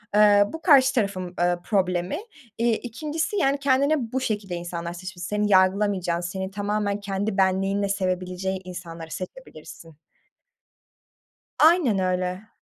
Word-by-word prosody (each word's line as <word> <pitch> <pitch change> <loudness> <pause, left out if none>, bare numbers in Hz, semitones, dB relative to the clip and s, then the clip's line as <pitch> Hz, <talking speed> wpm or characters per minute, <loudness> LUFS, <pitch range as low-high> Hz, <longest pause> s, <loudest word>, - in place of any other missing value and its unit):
Eee, 205 -1 +6
bu 320 - -6
karşı 270 -6 +5
tarafın, 185 -5 -2
ııı, 175 0 +1
problemi. 185 - 0 0.4
İii, 230 0 +2
2'ncisi, 310 - -4
yani, 275 -6 +2
kendine 275 -2 +1
bu 260 0 -1
şekilde 205 -6 -2
insanlar 170 0 -5
seç 185 +2 -8
s 175 - -15
Seni 210 +4 -1
yargılamayacağın, 185 -2 +2
seni 190 +2 -4
tamamen 205 0 -1
kendi 200 +1 -3
benliğinle 195 +1 +1
sevebileceği 185 -1 -2
insanları 170 -3 -8
seçebilirsin. 165 - -10 1.6
Aynen 305 - +5
öyle. 185 +2 -2
195 Hz, 125 wpm, -24 LUFS, 180-225 Hz, 1.6 s, Eee